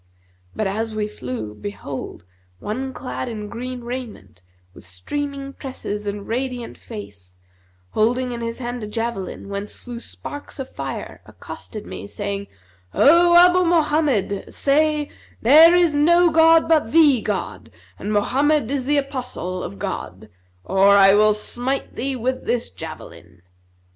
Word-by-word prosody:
[FN#239] 90 0 -37
But, 215 - -1
as 220 +3 -2
we 210 -1 -1
flew, 125 - -6
behold, 140 - -7 0.3
One 255 - -4
clad 255 -1 -5
in 215 -2 -6
green 250 +2 -6
raiment,[FN#240] 90 - -9
with - - -14
streaming 275 - -5
tresses 210 -7 -6
and 200 0 -4
radiant 250 0 -3
face, 100 - -10 0.6
holding 245 +3 +1
in 235 -1 -5
his 230 0 -4
hand 245 -2 -5
a - - -4
javelin 225 -3 -4
whence 200 +1 -5
flew 240 -1 -9
sparks 290 +4 -9
of 265 -2 -6
fire, - - -6
accosted 215 -3 -9
me, - - -7
saying, 200 -1 -4 0.5
'O 345 +4 +6
Abu 360 +1 +6
Mohammed, 300 - +1
say:—There 300 +1 +4
is 345 -3 +4
no 340 +4 +4
god 325 +1 +5
but 310 -8 +2
the 295 -7 +5
God 115 - -4 0.3
and 205 - -4
Mohammed 265 +5 +2
is 275 -3 -1
the 290 +2 +2
Apostle 250 -10 -3
of 100 - -6
God; - - -6 0.3
or 195 +1 +5
I 195 0 +7
will 210 0 +5
smite 245 +5 -4
thee 270 +2 -2
with 255 +1 -2
this 240 -1 -1
javelin.' 90 - -10
235 Hz, 140 wpm, -22 LUFS, 200-280 Hz, 0.6 s, I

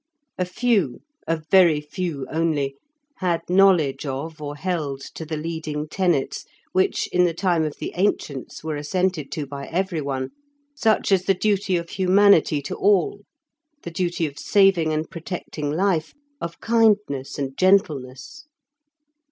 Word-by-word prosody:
A 180 - +1
few, 185 - 0 0.3
a 165 - +1
very 175 -6 +6
few 150 -2 -4
only, 155 -4 0 0.4
had 170 -3 0
knowledge 180 -7 +4
of 155 +3 -5
or 145 0 -5
held 150 -5 -3
to 160 - -7
the 155 0 -3
leading 155 -1 -4
tenets, 175 -5 0 0.3
which, 185 0 +1
in 180 0 +4
the 170 -2 0
time 175 -3 +1
of 155 -2 -3
the - - -5
ancients, 165 -10 -2
were 155 -1 -3
assented 155 +1 -1
to 150 - -3
by 140 0 -7
everyone, 155 -8 -2 0.4
such 225 -7 +1
as 190 -1 +3
the 195 - +3
duty 200 -1 +1
of 170 -1 -5
humanity 185 -6 +4
to 185 - -4
all, 205 - +2 0.6
the 170 - -6
duty 175 -1 -1
of 145 -2 -6
saving 195 -5 +3
and 155 +1 -2
protecting 165 -3 -5
life, 165 0 0 0.3
of 170 0 -5
kindness 210 - +2
and 135 -2 -3
gentleness. 185 - +1
165 Hz, 145 wpm, -23 LUFS, 150-190 Hz, 0.6 s, very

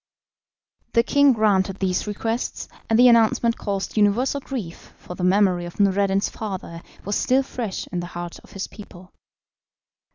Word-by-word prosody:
The 230 - +4
king 285 +2 +4
granted 195 -4 +1
these 190 +1 -1
requests, 225 +3 -3 0.2
and 225 - +3
the 250 +1 +7
announcement 230 0 +3
caused 200 0 -3
universal 220 +7 +2
grief, 225 -12 -7
for - - -9
the 180 - -6
memory 185 -2 +3
of 175 - -10
Noureddin's 195 0 +2
father 190 -5 -6 0.2
was 205 +1 -1
still 265 +2 +2
fresh 235 -7 -5
in 180 - -2
the 175 - -5
hearts 175 -1 -6
of - - -19
his 195 - -4
people. 185 -3 -13
200 Hz, 155 wpm, -23 LUFS, 185-230 Hz, 0.2 s, the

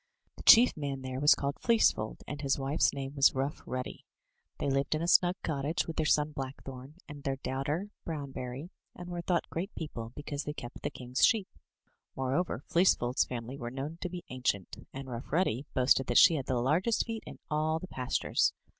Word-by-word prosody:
The - - -11
chief 245 +2 +8
man 140 -3 -4
there 130 0 -4
was 145 +2 +6
called 140 +1 -3
Fleecefold, 220 - +2
and 145 +1 -5
his 135 -2 +1
wife's 140 +3 +2
name 135 0 -5
was 135 -2 +4
Rough 135 +3 -2
Ruddy. 130 0 -5 0.5
They - - -2
lived 135 +2 +1
in 155 - -2
a - - -1
snug 175 0 +5
cottage 150 +1 -1
with 165 - -6
their 155 - +1
son, 150 0 +3
Blackthorn, 135 0 -7
and 145 -1 -9
their 135 -1 -1
daughter, 140 +9 -3
Brownberry, 140 0 -5 0.2
and 180 0 -8
were 175 -1 -4
thought 170 0 0
great 185 +5 -4
people, 115 -8 -6
because 145 0 -4
they 150 - -4
kept 120 -4 -8
the 145 - -2
king's 130 -2 -3
sheep. 220 -5 +4 0.7
More 130 0 -1
over, 165 -5 -1
Fleecef 175 -6 +3
old's 125 +2 +2
family 125 +2 -6
were 120 - -4
known 140 +6 -6
to 180 - -2
be 175 0 -7
ancient; 125 -7 -2
and 135 0 -7
Rough 120 -1 -7
Ruddy 150 -5 +1
boasted 130 0 +3
that 120 - +2
she - - +8
had 140 -5 -2
the 130 - +1
largest 165 - +2
feet 225 -1 -4
in - - -9
all 155 +1 +1
the 185 - -7
pastures. 130 -6 0
140 Hz, 200 wpm, -31 LUFS, 130-160 Hz, 0.7 s, chief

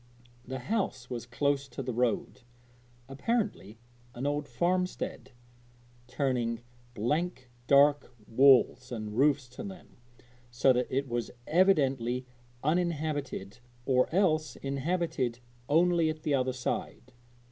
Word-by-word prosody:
The 130 +1 -5
house 130 - -2
was 120 -1 -5
close 140 +3 0
to 135 +1 -6
the 125 -1 -3
road 120 +1 -1 0.7
apparently 140 - -2 0.4
an 125 +3 -4
old 145 0 -1
farmstead 180 +1 -2 0.8
turning 125 -3 -1 0.3
blank 130 - -2 0.2
dark 145 0 +5 0.2
walls 130 0 +4
and 110 -3 -5
roofs 140 0 +3
to 125 - -8
them, 190 -3 -10 0.5
so 120 +2 +4
that 125 0 0
it 135 +1 -1
was 120 -2 -2 0.2
evidently 135 -9 +2 0.4
uninhabited 150 - -1 0.3
or 125 -1 +3
else 155 -7 +2
inhabited 140 -3 -2 0.3
only 170 +1 +4
at 155 0 -5
the 150 - 0
other 130 -1 +1
side. 125 0 -4
135 Hz, 115 wpm, -30 LUFS, 125-155 Hz, 0.8 s, dark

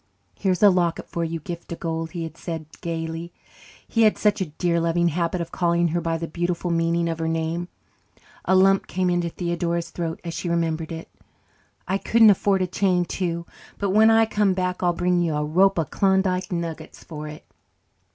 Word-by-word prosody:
"Here's 190 -1 0
a 205 - +8
locket 175 -2 0
for 170 - -3
you, 165 0 -3
Gift 170 +3 -8
o' - - -2
God," 165 -1 -3
he 165 +1 -5
had 160 0 -7
said 165 -2 -5 0.2
gaily 165 0 -4 0.6
he 230 - +1
had 215 -1 +5
such 210 -1 +2
a 185 - -1
dear 170 +3 0
loving 170 +1 +2
habit 170 +2 -1
of 170 - -5
calling 170 -1 +1
her 170 +2 -1
by 165 0 -1
the 165 0 -4
beautiful 175 +1 -2
meaning 170 0 +1
of 165 -1 -3
her 160 - -1
name. 165 +2 -2 0.8
A 190 - +3
lump 195 +1 +4
came 185 0 0
into 175 -1 0
Theodora's 170 0 -2
throat 165 -2 -4
as 170 -1 -5
she 175 - -3
remembered 165 -1 -1
it. 165 0 -6 0.8
"I 190 +2 0
couldn't 225 0 +6
afford 195 -1 +2
a - - +2
chain 180 -1 +1
too, 170 -2 -3 0.3
but 200 -2 -1
when 215 +3 +6
I 225 0 +5
come 210 -3 +1
back 180 -1 -2
I'll 175 -1 +3
bring 175 +1 +1
you 165 -3 0
a 150 0 0
rope 190 +6 +3
of 160 -4 -1
Klondike 190 -1 +1
nuggets 165 -2 -5
for 155 -2 -7
it." 150 0 -10
170 Hz, 200 wpm, -24 LUFS, 165-185 Hz, 0.8 s, a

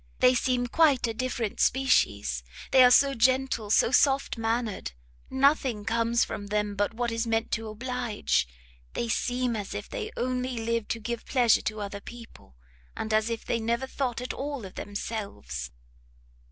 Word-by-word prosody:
they 250 - +6
seem 250 -1 +1
quite 280 0 +3
a 225 - -2
different 235 -3 -3
species! 105 - +2 0.3
they 260 -1 +8
are 250 - +8
so 275 +2 +5
gentle, 255 -2 +1
so 225 - +4
soft 275 +1 +3
mannered! 225 - -2 0.4
nothing 265 -5 +2
comes 230 +1 +2
from 205 - -6
them 210 0 -1
but 205 +2 -1
what 240 0 -1
is 230 +1 -1
meant 225 0 0
to 225 0 -2
oblige! 240 - -1 0.5
they 235 - -2
seem 245 +2 0
as 205 -3 -5
if - - -5
they 455 -4 -5
only 250 0 -2
lived 230 -1 -2
to 230 - -2
give 235 +1 -4
pleasure 245 -4 +4
to 215 0 -3
other 200 0 -5
people, 230 - -13 0.4
and 220 - -3
as 215 +1 +2
if 230 -1 -4
they 230 - 0
never 235 +3 -1
thought 255 -3 -3
at 250 - -4
all 280 -5 -4
of 185 - -10
themselves!" 205 - -5
235 Hz, 165 wpm, -27 LUFS, 220-255 Hz, 0.5 s, they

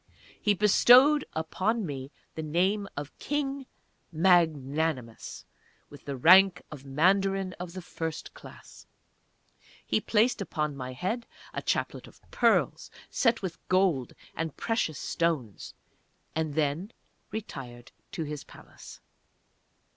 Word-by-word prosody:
He 205 -2 +3
bestowed 250 +8 +6 0.3
on 220 +2 0
me 135 -3 -5 0.2
the 160 - -5
name 185 +6 0
of 145 0 -6
"King 280 -2 -2 0.4
Magnanimous" 155 -7 +1 0.5
with 145 - -13
the 140 -2 -4
rank 180 +6 +6
of 145 -3 -9
Mandarin 190 +6 +2
of 175 -1 -6
the 185 -1 -7
First 160 -2 -5
Class. - - -14 1.0
He - - +1
placed 225 +1 +2
upon 150 -6 -2
my 130 -1 -6
head 220 - -3 0.3
a - - -3
chaplet - - -2
of - - -18
pearls - - +2 0.2
set 230 -4 +2
with 180 -3 -4
gold 185 -9 +2 0.2
and 165 -2 -4
precious 225 - -1
stones, 155 -11 -2 0.6
and 155 -2 -2
then 155 +7 -1 0.4
retired 130 - -8 0.2
to 165 - -3
his 150 -1 -6
Palace. - - -14
170 Hz, 115 wpm, -28 LUFS, 145-200 Hz, 1.0 s, bestowed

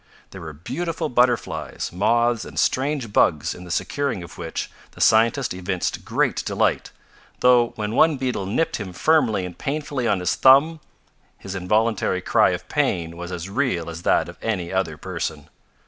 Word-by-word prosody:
There - - -9
were 80 -2 -7
beautiful 155 - -4
butterflies, 125 0 0
moths 115 +4 +2
and - - -11
strange 130 -5 0
bugs 80 -1 +2
in 90 - -11
the - - -11
securing 120 +3 -2
of 85 - -11
which 85 -2 -5 0.2
the - - -15
scientist 115 +3 +3
evinced 90 0 -3
great - - 0
delight, - - 0 0.5
though 120 -1 +4
when 105 -2 -3
one 155 +3 +4
beetle 125 -7 -2
nipped 160 +11 0
him 95 -4 -7
firmly 120 - +2
and 90 -1 -8
painfully 140 - -3
on 100 - +1
his 90 - 0
thumb 140 +5 +5 0.6
his 95 - -8
involuntary 100 +1 0
cry - - +3
of - - -4
pain 85 -1 -1
was 85 +1 -7
as 90 0 -5
real 95 - -1
as 85 0 -8
that - - +2
of - - -11
any 95 -6 -2
other 95 -5 -1
person. - - -5
110 Hz, 165 wpm, -23 LUFS, 90-130 Hz, 0.6 s, thumb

